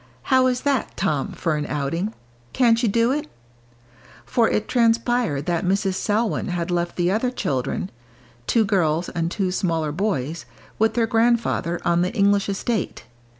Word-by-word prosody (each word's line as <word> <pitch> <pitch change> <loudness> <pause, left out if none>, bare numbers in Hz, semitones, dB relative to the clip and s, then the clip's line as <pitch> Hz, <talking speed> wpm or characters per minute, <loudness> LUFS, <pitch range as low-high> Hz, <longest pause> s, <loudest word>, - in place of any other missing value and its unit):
"How 260 0 +5
is 250 -1 0
that, 275 -5 -1
Tom, 145 -3 -1
for 165 -3 -1
an 150 - -3
outing? 165 +9 -2 0.4
Can't 235 -2 +3
you 235 - +2
do 230 +4 +2
it?" 300 +2 -2 1.0
For 230 -2 +2
it 210 - -1
transpired 230 - +1
that 170 -2 0
Mrs. 195 +1 +1
Selwyn 215 +3 0
had 175 -1 -2
left 175 0 -1
the 175 0 +1
other 225 +5 +1
children, 140 - -2 0.6
two 225 -2 +3
girls 175 -4 +1
and 165 -1 -2
two 185 0 -1
smaller 165 -5 -1
boys, 160 - -2 0.3
with 220 +1 +2
their 235 -2 +3
grandfather, 225 -6 +1
on 170 0 +3
the 180 +2 0
English 200 -1 +3
estate. 200 +1 -2
195 Hz, 155 wpm, -23 LUFS, 170-230 Hz, 1.0 s, How